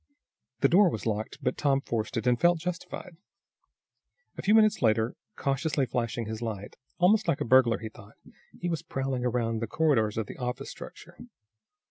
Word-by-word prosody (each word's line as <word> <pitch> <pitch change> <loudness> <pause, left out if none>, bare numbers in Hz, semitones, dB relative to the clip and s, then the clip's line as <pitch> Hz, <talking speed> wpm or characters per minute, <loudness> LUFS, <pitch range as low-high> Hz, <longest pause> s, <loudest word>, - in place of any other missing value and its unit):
The 140 - +6
door 185 +5 +5
was 110 - -5
locked, 110 -1 -2
but - - -1
Tom 140 -2 +3
forced 115 -2 -3
it, 115 - -2
and 125 -1 +2
felt 175 0 +5
justified. 175 0 -6 1.2
A - - -6
few 210 +3 +4
minutes 215 -1 +4
later, 110 0 +2 0.2
cautiously 140 0 0
flashing 115 -1 -2
his 110 +1 -5
light, 105 -3 -5 0.2
almost 205 +4 +3
like 165 -5 +1
a - - -1
burglar 120 -1 +5
he 110 - -7
thought, 110 -1 -16 0.4
he 175 - -3
was 165 -3 -1
prowling 135 -2 -3
around 115 -2 0
the 115 - -3
corridors 115 -8 +1
of 110 - -1
the - - -10
office 125 0 -4
structure. - - -12
125 Hz, 175 wpm, -28 LUFS, 115-160 Hz, 1.2 s, The